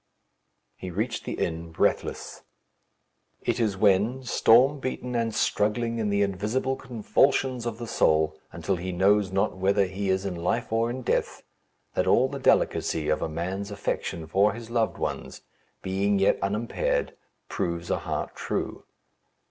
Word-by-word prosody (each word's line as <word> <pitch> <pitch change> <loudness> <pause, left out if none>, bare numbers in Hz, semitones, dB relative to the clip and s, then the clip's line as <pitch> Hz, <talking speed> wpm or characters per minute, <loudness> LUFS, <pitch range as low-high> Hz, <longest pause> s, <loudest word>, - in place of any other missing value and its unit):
He 95 - -6
reached 110 +7 -3
the - - -3
inn, 80 0 -3
breathless. 80 - -1 1.0
It - - 0
is 105 -4 +1
when, 105 +6 +3
storm 130 +4 +4
beaten 125 -1 -4
and 115 -1 0
struggling 115 +3 0
in 105 -2 0
the 100 0 +2
invisible 105 +7 -1
convulsions 130 +1 +1
of 115 -2 -4
the 120 - -6
soul 80 -7 +2 0.2
until 85 +3 -2
he 90 +2 -4
knows 95 +2 +3
not 95 +1 0
whether 95 +1 +2
he 95 +1 -3
is 95 +1 +1
in 95 - -2
life 85 +5 -1
or 115 +1 +2
in 125 +2 -5
death, - - -1 0.5
that - - 0
all 130 - +4
the 140 0 -6
delicacy 80 - +2
of 75 - +1
a - - -1
man's 95 +5 -3
affection 95 -4 -3
for 100 +6 +3
his 115 0 -9
loved 115 -2 0
ones, 65 +2 -4 0.4
being 100 +2 +1
yet 95 0 +3
unimpaired, 120 - -1 0.3
proves 85 -1 -3
a - - +1
heart - - -4
true. - - -4
100 Hz, 155 wpm, -26 LUFS, 95-120 Hz, 1.0 s, storm